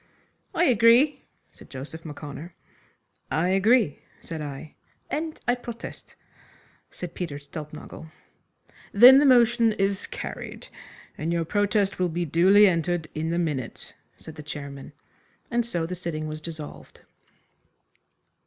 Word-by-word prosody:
"I -, -, +3 dB
agree," 250 Hz, -, +5 dB, 0.3 s
said -, -, -17 dB
Joseph 145 Hz, +5 st, -8 dB
M'Connor. 150 Hz, +2 st, -8 dB, 0.7 s
"I 165 Hz, +3 st, +1 dB
agree," 200 Hz, -, +3 dB, 0.2 s
said 160 Hz, -2 st, -7 dB
I. 145 Hz, +1 st, -7 dB, 0.4 s
"And 315 Hz, +1 st, -3 dB
I 245 Hz, -, +4 dB
protest," 240 Hz, -2 st, -8 dB, 0.7 s
said 180 Hz, -2 st, -8 dB
Peter 165 Hz, -6 st, -4 dB
Stulpnagel. 150 Hz, +2 st, -9 dB, 0.8 s
"Then 250 Hz, +6 st, +9 dB
the 290 Hz, -, +4 dB
motion 235 Hz, -3 st, +5 dB
is 195 Hz, -1 st, -1 dB
carried, -, -, -7 dB, 0.5 s
and 160 Hz, +2 st, -2 dB
your 170 Hz, -1 st, 0 dB
protest 205 Hz, +1 st, 0 dB
will 180 Hz, -1 st, +1 dB
be 170 Hz, +1 st, -2 dB
duly 185 Hz, +7 st, +6 dB
entered 175 Hz, -3 st, 0 dB
in 160 Hz, +1 st, -2 dB
the 170 Hz, -, -1 dB
minutes," 150 Hz, -8 st, -3 dB, 0.2 s
said 160 Hz, -, -11 dB
the 150 Hz, -, -9 dB
chairman, 140 Hz, -2 st, -8 dB, 0.6 s
and 240 Hz, 0 st, +2 dB
so 175 Hz, -8 st, -2 dB
the 175 Hz, -, -5 dB
sitting 170 Hz, -3 st, -4 dB
was 155 Hz, 0 st, -6 dB
dissolved. 155 Hz, -2 st, -9 dB
175 Hz, 125 wpm, -25 LUFS, 155-220 Hz, 0.8 s, Then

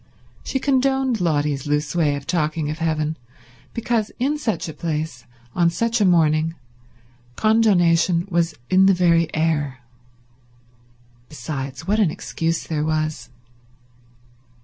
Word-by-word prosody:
She -, -, -2 dB
condoned 265 Hz, -3 st, +1 dB
Lotty's 150 Hz, -4 st, 0 dB
loose 150 Hz, +1 st, -1 dB
way 155 Hz, -4 st, +2 dB
of 140 Hz, -1 st, -7 dB
talking 155 Hz, -2 st, -1 dB
of 155 Hz, -, -6 dB
heaven, 155 Hz, -1 st, -1 dB, 0.5 s
because 230 Hz, -2 st, -1 dB
in 290 Hz, +4 st, 0 dB
such 225 Hz, -, -2 dB
a 160 Hz, -, -6 dB
place, 155 Hz, -5 st, -4 dB, 0.3 s
on 170 Hz, -1 st, +3 dB
such 230 Hz, +6 st, 0 dB
a -, -, +4 dB
morning, 165 Hz, -2 st, +3 dB, 0.8 s
condonation 180 Hz, -6 st, +3 dB
was 170 Hz, -3 st, 0 dB
in 190 Hz, +1 st, +5 dB
the 195 Hz, -, +5 dB
very 170 Hz, -2 st, +3 dB
air. 145 Hz, -5 st, -1 dB, 1.5 s
Besides, 135 Hz, 0 st, -6 dB
what 210 Hz, +4 st, +1 dB
an 200 Hz, -6 st, +4 dB
excuse 165 Hz, -1 st, -3 dB
there 150 Hz, -2 st, -2 dB
was. 155 Hz, 0 st, -2 dB
165 Hz, 125 wpm, -22 LUFS, 155-195 Hz, 1.5 s, in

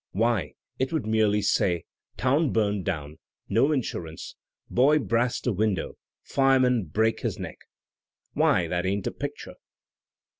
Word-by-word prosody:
Why, 110 Hz, -6 st, +1 dB, 0.3 s
it 130 Hz, 0 st, 0 dB
would 160 Hz, -7 st, -1 dB
merely 110 Hz, -1 st, +2 dB
say, 85 Hz, -4 st, +1 dB, 0.3 s
*Town 140 Hz, +4 st, +2 dB
burned 105 Hz, -3 st, 0 dB
down; 80 Hz, -4 st, -4 dB, 0.3 s
no 140 Hz, -, +3 dB
insurance; 85 Hz, -, -4 dB, 0.3 s
boy 140 Hz, +5 st, +4 dB
brast 120 Hz, -3 st, 0 dB
a 125 Hz, -, +2 dB
window; 100 Hz, -3 st, -1 dB, 0.3 s
fireman 130 Hz, -5 st, +3 dB
brake 110 Hz, +8 st, +1 dB
his -, -, -3 dB
neck!' -, -, -7 dB, 0.7 s
Why, 85 Hz, -, +3 dB
that 90 Hz, +2 st, -1 dB
ain't 100 Hz, +1 st, -1 dB
a -, -, -1 dB
picture!" -, -, -6 dB
110 Hz, 135 wpm, -26 LUFS, 95-130 Hz, 0.7 s, boy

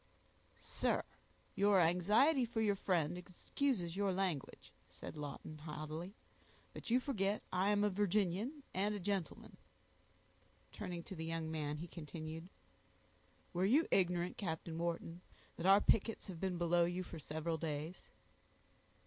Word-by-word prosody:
"Sir, -, -, 0 dB, 0.5 s
your 200 Hz, 0 st, +5 dB
anxiety 210 Hz, -, +4 dB
for 230 Hz, -1 st, -2 dB
your 215 Hz, -2 st, +3 dB
friend 175 Hz, -3 st, +1 dB
excuses 180 Hz, +1 st, -1 dB
your 200 Hz, -1 st, +1 dB
language," 180 Hz, -7 st, -2 dB, 0.2 s
said -, -, -8 dB
Lawton, 150 Hz, +1 st, -6 dB
haughtily; 155 Hz, +5 st, -6 dB, 0.6 s
"but -, -, -7 dB
you 245 Hz, +2 st, +5 dB
forget 210 Hz, -7 st, 0 dB
I 185 Hz, +2 st, +3 dB
am 205 Hz, 0 st, +3 dB
a 210 Hz, -, +4 dB
Virginian, 205 Hz, -, 0 dB
and 205 Hz, +3 st, +1 dB
a -, -, -3 dB
gentleman." 195 Hz, -3 st, -3 dB, 1.1 s
Turning 175 Hz, -2 st, -5 dB
to -, -, -8 dB
the 160 Hz, -, -4 dB
young 165 Hz, -1 st, -2 dB
man, 150 Hz, -2 st, -2 dB
he 165 Hz, +3 st, -6 dB
continued, 160 Hz, +1 st, -7 dB, 1.0 s
"Were 180 Hz, -, +1 dB
you 280 Hz, +11 st, +4 dB
ignorant, 180 Hz, -1 st, +2 dB
Captain 160 Hz, -3 st, -3 dB
Wharton, 170 Hz, 0 st, -2 dB, 0.3 s
that 170 Hz, -, -1 dB
our 195 Hz, +1 st, +8 dB
pickets 225 Hz, +1 st, +2 dB
have 185 Hz, -5 st, -7 dB
been 185 Hz, -1 st, -1 dB
below 170 Hz, 0 st, +3 dB
you 175 Hz, +2 st, -2 dB
for 170 Hz, -2 st, -8 dB
several 160 Hz, +2 st, -3 dB
days?" 155 Hz, +2 st, -4 dB
180 Hz, 140 wpm, -37 LUFS, 165-200 Hz, 1.1 s, our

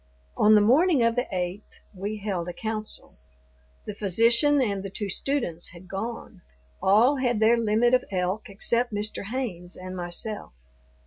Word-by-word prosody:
On 215 Hz, +1 st, +5 dB
the 210 Hz, -, +6 dB
morning 275 Hz, -, +4 dB
of 230 Hz, 0 st, +2 dB
the 245 Hz, +1 st, 0 dB
eighth 180 Hz, +2 st, -4 dB
we 205 Hz, +3 st, -4 dB
held 190 Hz, -4 st, -3 dB
a -, -, -5 dB
council. 215 Hz, -, -5 dB, 0.7 s
The 210 Hz, -, -5 dB
physician 230 Hz, -, +3 dB
and 205 Hz, -7 st, 0 dB
the 195 Hz, -, -6 dB
two 200 Hz, 0 st, -4 dB
students 185 Hz, -, -2 dB
had 180 Hz, +1 st, -13 dB
gone. 200 Hz, 0 st, -6 dB, 0.4 s
All 230 Hz, +9 st, +4 dB
had 245 Hz, -4 st, 0 dB
their 220 Hz, +2 st, +5 dB
limit 230 Hz, +1 st, +2 dB
of 255 Hz, -, +3 dB
elk 185 Hz, +3 st, -2 dB
except 235 Hz, +4 st, 0 dB
Mr. 210 Hz, 0 st, -3 dB
Haynes 200 Hz, -7 st, -4 dB
and 185 Hz, 0 st, -8 dB
myself. 180 Hz, -, -4 dB
210 Hz, 155 wpm, -26 LUFS, 190-235 Hz, 0.7 s, the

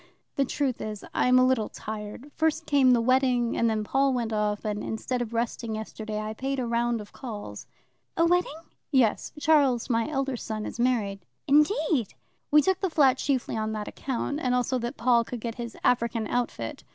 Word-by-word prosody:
"The 275 Hz, -, +2 dB
truth 265 Hz, -1 st, -1 dB
is, 215 Hz, -1 st, -5 dB
I -, -, +2 dB
am 250 Hz, 0 st, +5 dB
a 255 Hz, -, +6 dB
little 255 Hz, -4 st, +1 dB
tired. 215 Hz, +6 st, -7 dB
First 320 Hz, 0 st, 0 dB
came 275 Hz, -3 st, +4 dB
the 245 Hz, -, +5 dB
wedding, 250 Hz, -1 st, +2 dB
and 230 Hz, -, +2 dB
then 215 Hz, -1 st, 0 dB
Paul 270 Hz, +5 st, +2 dB
went 230 Hz, -2 st, -2 dB
off, 210 Hz, -1 st, -1 dB
and, 210 Hz, -1 st, -2 dB
instead 245 Hz, +3 st, -3 dB
of 235 Hz, -2 st, -4 dB
resting 230 Hz, -1 st, -2 dB
yesterday, 215 Hz, 0 st, -5 dB
I 215 Hz, 0 st, -4 dB
paid 270 Hz, +4 st, -3 dB
a 250 Hz, -, -1 dB
round 235 Hz, -1 st, 0 dB
of 205 Hz, -, -12 dB
calls." 205 Hz, -, -7 dB, 0.5 s
"A 335 Hz, -, +4 dB
wedding?" 350 Hz, -3 st, +1 dB, 0.3 s
"Yes; 255 Hz, -6 st, +2 dB
Charles, 280 Hz, -6 st, +3 dB
my 230 Hz, +3 st, +1 dB
elder 270 Hz, -3 st, -1 dB
son, 215 Hz, -2 st, -4 dB
is -, -, -7 dB
married." 225 Hz, -6 st, +1 dB, 0.3 s
"Indeed!" 300 Hz, -, +2 dB, 0.3 s
"We 300 Hz, 0 st, +6 dB
took 380 Hz, -1 st, +1 dB
the 380 Hz, -, 0 dB
flat 270 Hz, -5 st, +4 dB
chiefly 265 Hz, -5 st, -1 dB
on 220 Hz, 0 st, -2 dB
that 210 Hz, -1 st, -4 dB
account, 275 Hz, +2 st, -3 dB
and 250 Hz, -4 st, +1 dB
also 250 Hz, +1 st, 0 dB
that 240 Hz, 0 st, -4 dB
Paul 240 Hz, -1 st, +3 dB
could 240 Hz, +1 st, -6 dB
get 230 Hz, +1 st, -4 dB
his 235 Hz, -1 st, -7 dB
African 235 Hz, -2 st, +1 dB
outfit. 215 Hz, -, -3 dB
240 Hz, 195 wpm, -27 LUFS, 220-270 Hz, 0.5 s, a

